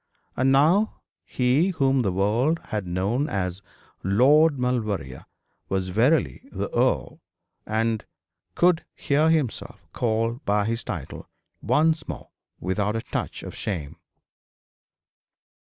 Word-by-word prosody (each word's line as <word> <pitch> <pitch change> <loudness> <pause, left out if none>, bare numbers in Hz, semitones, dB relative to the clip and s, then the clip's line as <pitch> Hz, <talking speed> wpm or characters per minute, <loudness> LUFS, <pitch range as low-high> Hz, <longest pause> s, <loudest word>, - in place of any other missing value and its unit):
And 130 +1 +2
now 165 +11 +4 0.3
he 130 +7 +2
whom 135 -6 +2
the 100 -5 0
world 110 - +1
had 105 -4 -3
known 100 - 0
as 90 -1 -2 0.4
Lord 140 - +4
Maulevrier 105 - -2 0.4
was 95 -1 -1
verily 110 - +1
the - - -4
earl, - - 0 0.5
and 110 0 0 0.5
could 175 -1 +3
hear 150 +3 +2
himself 155 -8 -1
called 115 +2 -1
by 105 0 +1
his 115 +2 -2
title 80 -8 -6 0.3
once 160 +1 +2
more - - -7 0.3
without 105 +4 -1
a 115 - -2
touch - - -4
of - - -7
shame. 80 -6 -4
115 Hz, 115 wpm, -25 LUFS, 100-140 Hz, 0.5 s, now